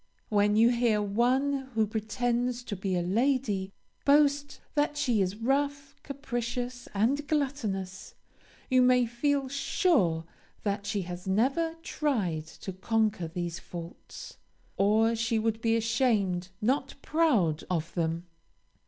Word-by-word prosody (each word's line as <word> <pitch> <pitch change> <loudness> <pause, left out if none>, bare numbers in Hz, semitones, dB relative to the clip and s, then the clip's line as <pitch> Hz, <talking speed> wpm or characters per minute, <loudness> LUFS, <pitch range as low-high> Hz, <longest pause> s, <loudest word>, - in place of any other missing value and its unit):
When 205 0 +3
you 225 +2 +6
hear 235 -3 +2
one, 260 +6 +1
who 220 -1 +3
pretends 240 +3 -1
to 215 - -5
be 190 0 -2
a 175 - 0
lady, 210 -1 0 0.3
boast 285 0 +3
that 295 0 +1
she 245 -7 +2
is 190 +1 0
rough, 280 +4 -1
capricious, 245 -3 -4
and 270 +8 +1
gluttonous, 220 -11 -2 0.5
you 255 -1 +4
may 250 -1 +5
feel 270 +4 0
sure 260 - +1 0.4
that 200 0 -2
she 205 -2 -1
has 180 +1 -7
never 270 - +1
tried 190 - -1
to 190 +4 -8
conquer 215 -1 0
these 170 0 -4
faults, 170 -1 -10 0.4
or 220 +3 +3
she 230 0 0
would 220 0 -1
be 225 -1 +2
ashamed, 215 -6 +1
not 265 +4 0
proud, 235 - +2
of 165 -3 -2
them. 165 0 -1
230 Hz, 125 wpm, -29 LUFS, 195-270 Hz, 0.5 s, you